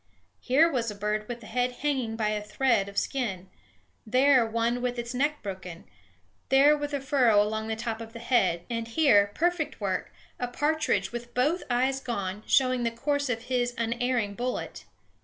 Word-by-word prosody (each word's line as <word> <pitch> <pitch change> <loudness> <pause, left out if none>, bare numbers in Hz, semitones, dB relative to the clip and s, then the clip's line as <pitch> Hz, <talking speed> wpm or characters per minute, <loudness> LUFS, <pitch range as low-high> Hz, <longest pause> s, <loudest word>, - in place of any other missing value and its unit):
Here 280 +6 +4
was 245 -8 -1
a 210 - -6
bird 210 +1 -2
with 240 -1 -6
the - - -12
head 250 +3 -1
hanging 260 -5 -2
by 220 -2 0
a 210 0 -1
thread 210 -1 +1
of 200 - -13
skin; 195 -9 -2 0.5
there 255 +2 +4
one 230 +2 -1
with 245 0 -2
its 235 +1 -4
neck 290 +4 -1
broken; 185 -4 -7 0.7
there 275 +3 +6
a 290 -1 -2
furrow 260 -6 +3
along 220 +1 0
the 220 - -2
top 225 0 -4
of 225 0 -8
the 230 - -9
head; 195 -8 +1
and 230 -1 -3
here 220 -7 +4
perfect 345 -2 0
work! - - -2 0.3
a 245 - -1
partridge 275 -7 0
with 240 0 -7
both 295 +8 +2
eyes 260 +2 +1
gone, 205 -6 -4
showing 255 -2 +3
the 235 - +1
course 285 +4 -1
of 230 -1 -2
his 245 -1 -1
unerring 235 -2 -1
bullet. 245 +4 -4
240 Hz, 175 wpm, -27 LUFS, 220-265 Hz, 0.7 s, there